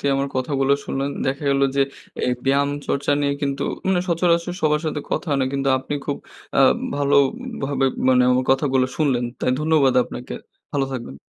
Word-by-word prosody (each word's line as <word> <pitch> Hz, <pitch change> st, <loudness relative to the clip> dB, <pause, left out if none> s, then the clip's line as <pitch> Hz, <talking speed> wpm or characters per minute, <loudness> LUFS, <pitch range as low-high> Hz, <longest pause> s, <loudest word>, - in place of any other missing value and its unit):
দিয়ে 140 Hz, -1 st, +1 dB
আমার 140 Hz, 0 st, -1 dB
কথাগুলো 135 Hz, +1 st, +1 dB
শুনলেন। 135 Hz, +1 st, -2 dB, 0.2 s
দেখা 135 Hz, +2 st, -2 dB
গেল 140 Hz, 0 st, +2 dB, 0.2 s
যে, 140 Hz, -, +5 dB, 0.4 s
এই 125 Hz, -, +1 dB
ব্যায়াম-চর্চা 140 Hz, +1 st, +1 dB
নিয়ে 140 Hz, 0 st, +1 dB
কিন্তু, 140 Hz, -1 st, -1 dB, 0.2 s
মানে 190 Hz, -2 st, +2 dB
সচরাচর 170 Hz, +1 st, +1 dB
সবার 150 Hz, -1 st, +2 dB
সাথে 150 Hz, -1 st, -2 dB
কথা 155 Hz, -, -2 dB
হয় 140 Hz, -, +2 dB
না। 130 Hz, -, +1 dB
কিন্তু 140 Hz, 0 st, 0 dB
আপনি 130 Hz, -, -5 dB
খুব 145 Hz, -, -1 dB, 0.4 s
আ -, -, +6 dB, 0.4 s
ভালোভাবে, 140 Hz, -, +1 dB, 0.2 s
মানে 125 Hz, -1 st, +5 dB
আমার 125 Hz, +1 st, +2 dB
কথাগুলো 135 Hz, -1 st, +2 dB
শুনলেন। 130 Hz, -6 st, +1 dB, 0.2 s
তাই -, -, +1 dB
ধন্যবাদ 150 Hz, -4 st, +3 dB
আপনাকে। 125 Hz, -, -7 dB, 0.4 s
ভালো 140 Hz, -1 st, +1 dB
থাকবেন। 120 Hz, -, -6 dB
140 Hz, 170 wpm, -22 LUFS, 135-150 Hz, 0.4 s, আ